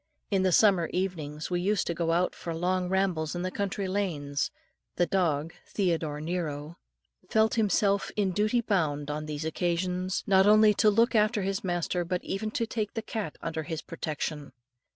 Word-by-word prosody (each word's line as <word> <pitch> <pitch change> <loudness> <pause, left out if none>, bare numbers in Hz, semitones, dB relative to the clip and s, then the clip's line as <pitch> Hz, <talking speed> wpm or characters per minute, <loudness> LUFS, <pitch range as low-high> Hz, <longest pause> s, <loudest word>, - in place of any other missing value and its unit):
In 195 -2 +3
the 185 -1 +2
summer 185 -3 +5
evenings, 160 -4 -3
we 175 0 +1
used 200 +1 +1
to 170 - -1
go 165 0 0
out 175 +2 +1
for 165 -1 -5
long 180 +1 0
rambles 180 -4 0
in 175 - -3
the 185 - -2
country 200 0 -2
lanes. 155 -8 -1 0.5
The 175 - +3
dog 165 -4 0
Theodore 165 -6 -1
Nero 155 -1 -4 0.5
felt 220 0 +3
himself 200 -2 +2
in 200 -3 +1
duty 215 +5 +1
bound 150 -9 0
on 150 +1 -4
these 150 +1 -4
occasions, 180 +3 -1
not 190 0 +5
only 215 0 +7
to 215 +1 +4
look 230 +3 +3
after 215 -1 +3
his 195 +1 -2
master, 175 -1 -1
but 180 +1 -2
even 215 +3 -3
to 230 +1 -1
take 220 -2 -3
the 225 - -2
cat 210 -9 -4
under 160 -1 -2
his 160 0 -5
protection. 150 -3 -4
180 Hz, 175 wpm, -28 LUFS, 160-200 Hz, 0.5 s, only